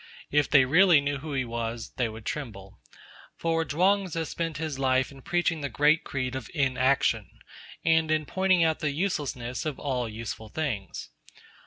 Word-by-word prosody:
If 145 -1 +2
they 140 -3 +6
really 170 +3 +6
knew 140 0 -2
who 150 +1 -6
he 130 -2 0
was, 115 -1 -4
they 120 -3 0
would 110 0 -10
tremble. 100 -9 -6 0.6
For 165 0 0
Chuang 185 +6 +2
Tzu 165 -1 -3
spent 165 -1 -3
his 155 -3 -4
life 130 0 +2
in 135 -1 -13
preaching 175 0 0
the 140 - -2
great 150 +6 +3
creed 130 -2 -3
of 130 -4 -6
Inaction, 130 -1 +2 0.6
and 160 -1 +3
in 155 -1 +1
pointing 185 +1 +2
out 160 -1 +1
the 150 - 0
uselessness 140 -7 -2
of 155 -4 -3
all 125 -5 -2
useful 110 0 -6
things. 120 -9 -4
145 Hz, 170 wpm, -27 LUFS, 125-160 Hz, 0.6 s, they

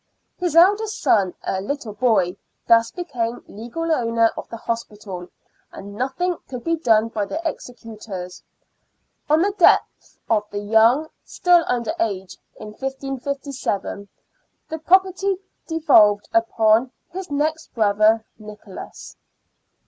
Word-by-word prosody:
His 350 -4 -1
eldest 410 +5 +4
son, 190 -4 +2
a 190 - -2
little 235 0 -4
boy, 210 -5 +2 0.3
thus 230 0 +5
became 245 -9 -4
legal 240 +11 -5
owner 230 -5 +2
of - - -8
the 230 - -7
hospital, 210 -6 -5 0.4
and 200 +1 -10
nothing 270 - -2
could 250 -2 -6
be 330 0 +1
done 225 -8 +2
by 210 -2 -2
the 310 - -4
executors. 215 - -8 0.9
On 310 +3 +4
the 400 +1 0
death - - +3
of 210 -2 0
the 205 - -6
youth, 225 +8 +3 0.2
still 355 -1 +3
under 245 +5 -1
age, 195 - -2 0.2
in 215 - -9
1557, 270 -4 -4 0.6
the 320 - -4
property 380 +3 +2 0.3
devolved 225 -11 +4
upon 225 +1 +3 0.2
his 370 0 -6
next 310 +2 -2
brother, 215 0 +3
Nicholas. 210 -2 -11
230 Hz, 120 wpm, -22 LUFS, 210-315 Hz, 0.9 s, thus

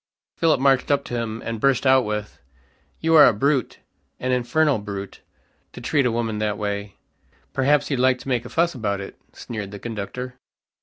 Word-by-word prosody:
Philip 165 -5 +2
marched 135 -1 +3
up 140 -1 +2
to - - -8
him, 115 -1 -3
and 115 -1 -3
burst 135 +1 +2
out 130 -1 +5
with, 105 0 -4 0.6
"You 165 0 +2
are 150 -3 +9
a - - +4
brute, 135 +3 0 0.4
an 130 - -1
infernal 130 +2 +2
brute, 100 -1 -7 0.5
to - - -9
treat 140 -4 +1
a - - 0
woman 115 -2 -2
that 105 -1 -1
way." 100 -1 -4 0.6
"Perhaps 145 +2 +2
you'd 135 - 0
like 130 0 +3
to - - -12
make 125 -3 0
a 120 - -9
fuss 170 +1 +1
about 100 -5 -2
it," 100 - -8 0.2
sneered 105 -4 -6
the 100 - -8
conductor. 120 +4 -6
125 Hz, 190 wpm, -23 LUFS, 105-135 Hz, 0.6 s, are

